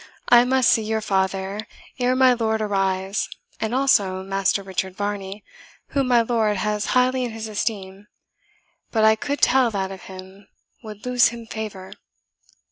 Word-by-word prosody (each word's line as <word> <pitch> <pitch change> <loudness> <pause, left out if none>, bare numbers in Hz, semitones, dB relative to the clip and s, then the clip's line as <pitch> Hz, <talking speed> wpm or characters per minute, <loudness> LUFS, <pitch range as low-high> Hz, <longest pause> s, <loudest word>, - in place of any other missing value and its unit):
I 240 0 +7
must 260 -1 +3
see 225 - +3
your 220 0 -2
father 195 +1 -2 0.3
ere 250 +1 +2
my 255 -1 +5
lord 220 -2 -1
arrives, 195 -1 -1 0.3
and 220 - -2
also 200 -9 +2
Master 195 +1 0
Richard 190 -1 -4
Varney, 205 -1 -4 0.5
whom 275 -2 0
my 240 -2 +4
lord 220 -3 0
has 210 +1 -1
highly 255 +1 +2
in 245 - -2
his 220 0 -6
esteem 205 -2 -4 0.8
but 220 -2 +1
I 220 0 +6
could 285 +6 -4
tell 255 -1 +4
that 195 -3 -3
of 190 -2 -9
him 190 +1 -12 0.3
would 215 -2 -10
lose 250 -1 +4
him 235 -1 -7
favour." 210 -4 -7
215 Hz, 155 wpm, -22 LUFS, 195-235 Hz, 0.8 s, I